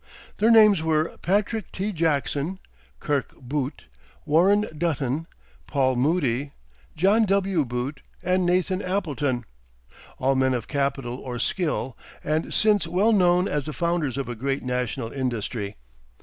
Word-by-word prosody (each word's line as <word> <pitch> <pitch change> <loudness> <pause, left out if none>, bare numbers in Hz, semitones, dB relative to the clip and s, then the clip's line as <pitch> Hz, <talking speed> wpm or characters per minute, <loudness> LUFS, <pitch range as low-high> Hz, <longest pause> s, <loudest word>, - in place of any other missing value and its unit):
Their 220 +3 +3
names 215 -6 +7
were 160 0 0
Patrick 205 +4 0
T. 200 +3 -2
Jackson, 155 0 0 0.4
Kirk 145 -4 -2
Boott, 135 +2 -3 0.4
Warren 195 +7 +4
Dutton, 150 -1 -1 0.4
Paul 130 -3 +1
Moody, 140 -1 0 0.4
John 200 +7 +4
W. 195 -4 +2
Boott, 125 +4 -4 0.2
and 185 +1 +2
Nathan 185 +2 +1
Appleton; 145 - -1 0.7
all 135 +1 +2
men 130 -1 +2
of 115 -3 -4
capital 140 -4 -1
or 125 -2 -6
skill, 135 -2 -1 0.3
and 155 +2 -1
since 210 -5 +2
well 190 +7 +2
known 180 -1 +4
as 145 -2 -1
the 155 - -4
founders 170 -4 -1
of 140 - -2
a 120 - -3
great 135 +4 -2
national 125 -2 -2
industry. 115 -5 -3
150 Hz, 135 wpm, -25 LUFS, 130-185 Hz, 0.7 s, names